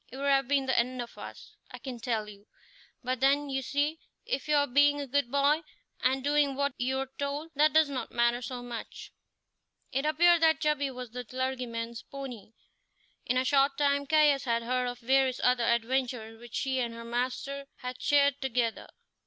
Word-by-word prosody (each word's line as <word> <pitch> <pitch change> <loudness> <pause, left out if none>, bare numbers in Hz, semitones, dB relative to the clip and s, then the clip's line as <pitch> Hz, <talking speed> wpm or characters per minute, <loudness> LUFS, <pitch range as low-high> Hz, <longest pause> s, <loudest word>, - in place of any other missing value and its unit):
It 260 - -8
would 280 - -3
have 270 -2 +3
been 275 -1 +2
the 260 - +2
end 250 +2 -1
of 240 -1 -6
us, - - -11
I - - -9
can 255 -3 -7
tell 225 -3 -2
you; 205 0 -13 0.6
but 255 0 -1
then, 280 +2 +2
you 270 0 -1
see, 290 +5 -1 0.3
if 270 +2 -3
you 300 - +3
are 285 -1 +4
being 290 +2 +3
a 285 - -3
good 275 -1 0
boy 285 +3 +3 0.4
and 260 +1 +1
doing 290 -1 +2
what 280 0 0
you're 265 +2 -1
told, 285 +3 -3
that 300 +2 +3
does 315 -1 +5
not 275 -2 -5
matter 240 +1 +2
so 250 0 -6
much." 240 -2 -8 0.8
It 270 +3 0
appeared 340 +2 +4
that 320 -1 +4
Chubby 300 -3 +1
was 250 -3 -8
the 250 +1 -5
clergyman's 245 -2 -4
pony. 255 -6 -9 0.7
In 250 - +1
a 255 - +2
short 275 +1 +3
time 280 -1 +1
Caius 295 -3 +4
had 235 -1 0
heard 250 +1 0
of 245 0 -4
various 260 +1 +2
other 250 -1 +3
adventures 235 -1 -1
which 240 -1 -11
she 265 -1 0
and 235 -2 -2
her 230 0 -8
master 255 +4 -3
had 250 0 -6
shared 285 -1 +3
together. 245 -3 -1
265 Hz, 190 wpm, -29 LUFS, 245-285 Hz, 0.8 s, does